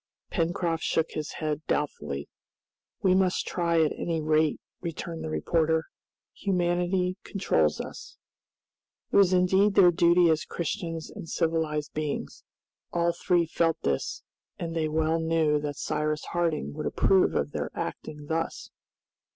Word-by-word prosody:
Pencroft 165 -1 0
shook 160 - 0
his 150 -1 -4
head 155 -1 -2
doubtfully. 75 - -2 0.8
"We 185 - +5
must 185 -1 +2
try 170 -2 +2
at 155 - +1
any 165 -2 -2
rate," 155 0 +2 0.2
returned 165 -1 -5
the - - -4
reporter; 160 - +1 0.5
"humanity 180 0 0
commands 80 - +1
us." - - -8 0.9
It - - +3
was 195 -2 +6
indeed 190 +3 +3
their 180 -2 +7
duty 170 0 +5
as 155 0 +1
Christians 165 0 -4
and 165 - -9
civilized 160 -3 -1
beings. 150 -1 -4 0.5
All 170 0 +1
three 175 0 +2
felt 165 0 +1
this, 70 -1 -1 0.3
and 165 -1 -4
they 160 -1 0
well 160 +1 +1
knew 160 -2 +2
that 145 -1 -4
Cyrus 150 +1 -1
Harding 170 -3 -1
would 150 +1 -3
approve 190 -1 +3
of 70 +1 0
their - - -3
acting 150 -1 -5
thus. 165 +2 -3
165 Hz, 135 wpm, -27 LUFS, 155-175 Hz, 0.9 s, their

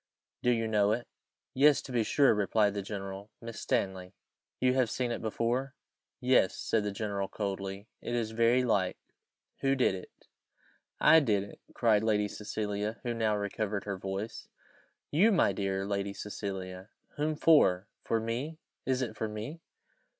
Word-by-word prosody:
do 125 - +2
you 115 -2 +2
know 105 -1 +3
it?" 120 +2 -3 0.5
"Yes, 145 +2 +5
to 130 - -9
be 120 -2 +2
sure," 140 +4 +4
replied 105 0 +2
the 100 - -2
general; 100 0 -6
"Miss 115 -1 -7
Stanley." 95 -1 -1 0.4
"You 125 0 +3
have 130 -3 +2
seen 125 0 -1
it - - -3
before?" 120 +4 -1 0.4
"Yes," 125 -7 +3
said 110 -2 0
the 105 - -2
general, 100 -1 -2
coldly. 100 0 -4
"It 120 - -3
is 115 -2 -1
very 115 +3 +3
like. 100 -6 +1 0.6
Who 135 0 +2
did 130 -7 +3
it?" 95 - -7 0.9
"I 160 - +7
did 105 -9 +1
it," 100 - -12 0.2
cried 110 -4 +4
Lady 105 -2 +2
Cecilia, 105 +1 -3
who 120 -2 -1
now 110 -2 +1
recovered 100 0 -2
her 100 -1 -3
voice. 95 +3 -5 0.6
"You, 195 +10 +5
my 170 - +3
dear 95 0 -1
Lady 100 0 -2
Cecilia! 95 -2 -6 0.3
Whom 155 +1 0
for? 105 - +4 0.2
for 115 - +1
me? 120 +8 -3 0.3
is 130 0 +1
it 110 -3 -4
for 110 - -2
me?" 110 +10 -6
110 Hz, 160 wpm, -31 LUFS, 100-125 Hz, 0.9 s, I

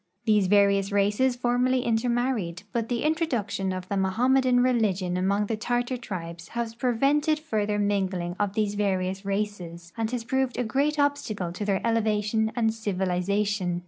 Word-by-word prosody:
These 210 -4 +3
various 200 0 +3
races 205 +6 +2
formerly 250 +1 +1
intermarried, 235 -6 0
but 230 -2 -1
the 240 -2 -1
introduction 250 - -1
of 185 0 -5
the - - -4
^Mohammedan 245 +6 +3
religion 200 -8 +1
among 200 +3 +1
the 225 - -2
Tartar 245 +3 -1
trilies 170 -7 -7
has 230 -1 -2
pre 245 +1 0
vented 295 +5 +2
further 215 -9 -1
mingling 190 -4 -1
of 205 -1 0
these 210 -1 0
various 190 -2 -1
races 185 -4 -4
and 225 -1 -1
has 245 -1 -3
proved 265 +1 -1
a 250 - +1
great 280 +7 0
obstacle 255 -11 0
to 195 +4 -5
their 195 -2 0
elev'^ation 220 -1 +1
and 225 -2 +1
civilization. 195 -2 -1
210 Hz, 155 wpm, -26 LUFS, 195-245 Hz, -, These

